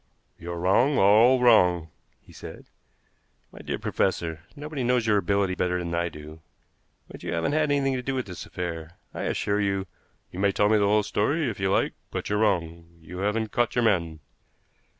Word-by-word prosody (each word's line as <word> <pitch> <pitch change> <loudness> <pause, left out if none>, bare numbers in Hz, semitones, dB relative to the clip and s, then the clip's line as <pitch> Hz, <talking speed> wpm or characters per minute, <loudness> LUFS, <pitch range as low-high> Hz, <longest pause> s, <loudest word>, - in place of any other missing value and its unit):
"You're 85 +1 -6
wrong, 110 +11 +2
all 110 +6 +5
wrong," 90 -9 +4 0.3
he - - -19
said. - - -10 0.9
"My - - -13
dear - - -4
professor, 85 -4 -1
nobody 145 -2 -5
knows 125 -1 +1
your 105 -2 +3
ability 100 -2 +1
better 90 0 -1
than 85 -1 -4
I 85 +1 0
do, 75 0 -11 0.7
but - - -12
you - - -5
haven't 85 +9 0
had 155 0 +1
anything 140 -1 +1
to 130 - -2
do 135 +2 -3
with 130 - -2
this 90 -4 -8
affair. 85 -1 -6 0.2
I - - -4
assure 100 +1 0
you 95 -1 -1 0.2
" - - -42
"You 90 - -8
may 100 0 +2
tell 105 +1 +2
me 110 0 +4
the 100 - +2
whole 105 +1 +3
story, 135 +8 0
if 100 - -10
you 95 0 0
like, - - +1 0.2
but - - -5
you're 105 - +1
wrong. 85 -5 -1
You 85 +3 -9
haven't 105 +2 -1
caught 120 0 0
your 120 - +2
man." 85 -8 0
100 Hz, 195 wpm, -26 LUFS, 85-120 Hz, 0.9 s, all